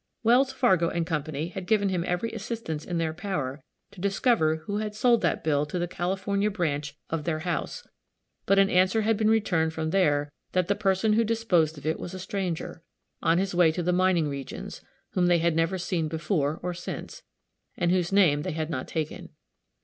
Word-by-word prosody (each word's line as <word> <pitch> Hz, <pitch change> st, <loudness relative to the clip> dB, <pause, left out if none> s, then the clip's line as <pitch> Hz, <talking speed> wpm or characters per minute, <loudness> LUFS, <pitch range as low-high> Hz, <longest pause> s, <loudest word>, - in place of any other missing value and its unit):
Wells, 250 Hz, +4 st, +4 dB
Fargo 190 Hz, -11 st, +3 dB
& -, -, -6 dB
Co. 160 Hz, -3 st, -1 dB, 0.3 s
had 190 Hz, -2 st, -6 dB
given 205 Hz, -3 st, +3 dB
him 180 Hz, -2 st, -1 dB
every 180 Hz, +6 st, -1 dB
assistance 215 Hz, -8 st, -5 dB
in 175 Hz, -, -3 dB
their 160 Hz, -1 st, -1 dB
power 155 Hz, -7 st, -4 dB, 0.3 s
to 180 Hz, -, -12 dB
discover 200 Hz, -5 st, +2 dB
who 205 Hz, -, -2 dB
had 210 Hz, 0 st, -3 dB
sold 235 Hz, +1 st, +3 dB
that 175 Hz, -, 0 dB
bill 145 Hz, -2 st, +2 dB
to 165 Hz, -, -4 dB
the 175 Hz, 0 st, -1 dB
California 195 Hz, +4 st, -1 dB
branch 150 Hz, -7 st, -2 dB
of 160 Hz, -2 st, -1 dB
their 155 Hz, -1 st, -2 dB
house; 180 Hz, -, -3 dB, 0.6 s
but 195 Hz, -, +4 dB
an 195 Hz, 0 st, +6 dB
answer 185 Hz, +4 st, +3 dB
had 225 Hz, +1 st, +2 dB
been 215 Hz, +1 st, +2 dB
returned 175 Hz, -8 st, +2 dB
from 160 Hz, 0 st, -2 dB
there 145 Hz, -6 st, +2 dB, 0.2 s
that 185 Hz, -2 st, +2 dB
the 200 Hz, -, +3 dB
person 205 Hz, +1 st, +1 dB
who 225 Hz, +2 st, +4 dB
disposed 190 Hz, -9 st, +1 dB
of 145 Hz, -, -11 dB
it 160 Hz, -, 0 dB
was 180 Hz, -, -6 dB
a -, -, -6 dB
stranger, 185 Hz, -4 st, -4 dB, 0.4 s
on 165 Hz, -, +3 dB
his 190 Hz, +1 st, 0 dB
way 175 Hz, -2 st, +5 dB
to 175 Hz, +2 st, -3 dB
the 180 Hz, +1 st, +1 dB
mining 180 Hz, -3 st, +3 dB
regions, 140 Hz, -2 st, -6 dB, 0.3 s
whom 180 Hz, -1 st, +2 dB
they 175 Hz, -1 st, +5 dB
had 170 Hz, -1 st, +1 dB
never 165 Hz, +3 st, +1 dB
seen 175 Hz, -3 st, -1 dB
before 160 Hz, -2 st, -1 dB
or 180 Hz, 0 st, -2 dB
since, 175 Hz, 0 st, -7 dB, 0.6 s
and 175 Hz, -1 st, +1 dB
whose 180 Hz, -1 st, +1 dB
name 175 Hz, -8 st, +4 dB
they 180 Hz, +2 st, -3 dB
had 160 Hz, +1 st, -3 dB
not 130 Hz, -3 st, -3 dB
taken. 155 Hz, -2 st, -4 dB
180 Hz, 200 wpm, -27 LUFS, 160-200 Hz, 0.6 s, an